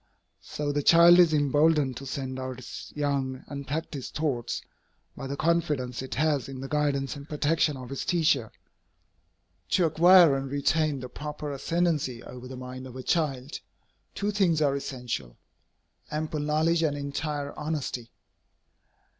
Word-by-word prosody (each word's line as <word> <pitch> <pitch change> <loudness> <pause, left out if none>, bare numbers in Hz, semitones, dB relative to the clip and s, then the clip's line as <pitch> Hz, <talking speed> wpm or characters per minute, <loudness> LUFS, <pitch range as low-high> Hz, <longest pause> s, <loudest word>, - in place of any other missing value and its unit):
So 145 -1 -3
the 145 0 0
child 170 +3 +7
is 175 -3 +6
emboldened 145 -1 +3
to 135 - -8
send 130 0 -4
out 130 -1 -5
its 125 -2 -9
young, 140 -3 -1
unpractised 140 0 -5
thoughts, 130 -6 -2 0.5
by 135 - -6
the 140 +1 -4
confidence 150 -7 0
it 130 - -5
has 145 -3 +1
in 135 -1 -7
the 135 - -5
guidance 145 -1 0
and 145 +1 -10
protection 150 0 +1
of 130 0 -9
its 135 - -3
teacher. 150 - +1 1.2
To 180 - +3
acquire 170 -1 +7
and 135 0 -3
retain 145 0 +1
the 125 - -5
proper 150 +3 -6
ascendancy 150 -4 -1
over 125 0 -9
the 130 0 -8
mind 130 +1 -7
of 125 - -11
a 130 - -6
child, 140 -4 -1 0.6
two 205 +1 -1
things 185 -6 +2
are 145 -2 +2
essential, 125 - -5 0.7
ample 155 0 -3
knowledge 155 +3 +2
and 150 -3 +1
entire 145 0 -3
honesty. 150 -6 -4
145 Hz, 145 wpm, -27 LUFS, 130-155 Hz, 1.2 s, child